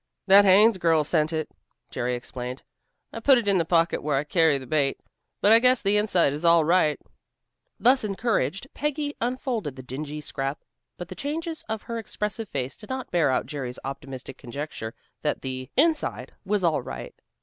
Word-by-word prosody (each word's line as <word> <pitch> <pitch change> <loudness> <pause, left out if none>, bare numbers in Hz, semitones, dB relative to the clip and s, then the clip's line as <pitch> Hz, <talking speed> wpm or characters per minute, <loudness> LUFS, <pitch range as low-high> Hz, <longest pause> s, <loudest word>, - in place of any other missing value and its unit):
"That 200 +1 +7
Haines 200 +2 +6
girl 165 -3 +3
sent 155 +1 +1
it," 160 -1 -3 0.4
Jerry 125 +1 -1
explained. 125 +1 -6 0.5
"I - - -5
put 265 +3 +6
it 230 -3 -2
in 195 -2 +4
the 165 - +1
pocket 165 0 +2
where 145 -2 0
I 140 - 0
carry 160 -1 +3
the 130 - -8
bait, 140 0 0 0.4
but 205 - +5
I 225 - +8
guess 250 -1 +4
the 200 +1 +2
inside 185 -8 +3
is 150 +3 -6
all 170 -2 +5
right." 165 -3 +3 0.8
Thus 255 +1 +4
encouraged, 200 - -1
Peggy 295 0 -2
unfolded 240 - -2
the 130 - -9
dingy 145 +4 -6
scrap, 135 -1 -4 0.3
but 175 - -7
the - - -6
changes 320 - -4
of 220 -1 -3
her 230 -1 -4
expressive 210 -1 -4
face 135 -1 -3
did 210 - -14
not 260 -1 -5
bear 170 -3 +3
out 130 - +1
Jerry's 130 -4 -5
optimistic 135 -1 -7
conjecture 125 -3 -6 0.3
that - - -1
the 130 -1 -5
"inside" 310 +2 +1
was 200 -1 0
all 160 -5 +2
right. - - -7
170 Hz, 185 wpm, -25 LUFS, 140-220 Hz, 0.8 s, I